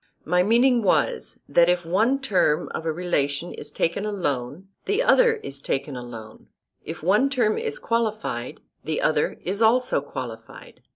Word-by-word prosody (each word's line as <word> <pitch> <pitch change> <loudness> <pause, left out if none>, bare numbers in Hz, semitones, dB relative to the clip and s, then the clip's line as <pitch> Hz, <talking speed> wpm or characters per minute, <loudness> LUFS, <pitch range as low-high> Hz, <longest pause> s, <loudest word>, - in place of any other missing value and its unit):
My 180 +2 +3
meaning 240 +5 +4
was, 465 - 0
that 170 0 +4
if 175 -1 +1
one 220 +11 +2
term 190 - +1
of 165 - -5
a - - +1
relation 155 -2 -2
is 145 - -9
taken 165 +6 -1
alone, 170 -5 -3 0.2
the 410 +5 +1
other - - +5
is 140 - -9
taken 140 0 -3
alone; 115 -3 -10 0.4
if - - -8
one 210 +10 +3
term 240 -6 +1
is 145 - -3
qualified, 215 - -2 0.2
the 155 +1 -2
other 150 -1 +1
is 200 +4 -2
also 235 - +3
qualified. 120 -5 -9
180 Hz, 155 wpm, -24 LUFS, 145-230 Hz, 0.4 s, other